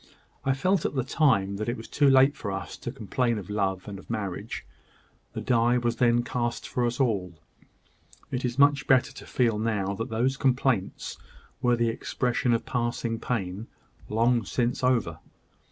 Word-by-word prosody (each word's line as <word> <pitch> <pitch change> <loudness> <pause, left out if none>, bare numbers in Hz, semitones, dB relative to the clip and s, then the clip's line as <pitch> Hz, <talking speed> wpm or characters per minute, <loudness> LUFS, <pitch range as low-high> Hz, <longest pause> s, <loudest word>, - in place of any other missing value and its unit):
I 135 0 +1
felt 185 +5 +1
at - - -2
the 130 - +1
time 110 -8 +2
that 110 +2 -2
it 120 - -2
was 110 - -9
too 145 -1 +3
late 135 +2 +5
for 100 - -4
us 95 0 -5
to 120 - -6
complain 120 -1 -1
of 100 -1 -7
love 95 -2 -1
and 100 -2 -6
of - - -16
marriage. 105 -5 -4 0.7
The - - -4
die 120 -1 +3
was 120 -1 -1
then 120 -1 +3
cast 120 -1 -2
for 120 -1 0
us 120 +2 -3
all. 95 - 0 0.9
It 125 - -2
is 125 0 -2
much 140 -1 +4
better 130 -2 +4
to - - -11
feel 115 -4 +1
now 105 -3 0
that 115 +5 -4
those 125 +4 0
complaints 130 -7 0 0.4
were 120 -2 +3
the 120 -1 +1
expression 125 +2 -1
of 115 - +1
passing 120 -2 -2
pain, 100 -3 -3 0.4
long 115 +2 +2
since 120 +5 -1
over." 115 -11 +1
120 Hz, 175 wpm, -27 LUFS, 105-125 Hz, 0.9 s, late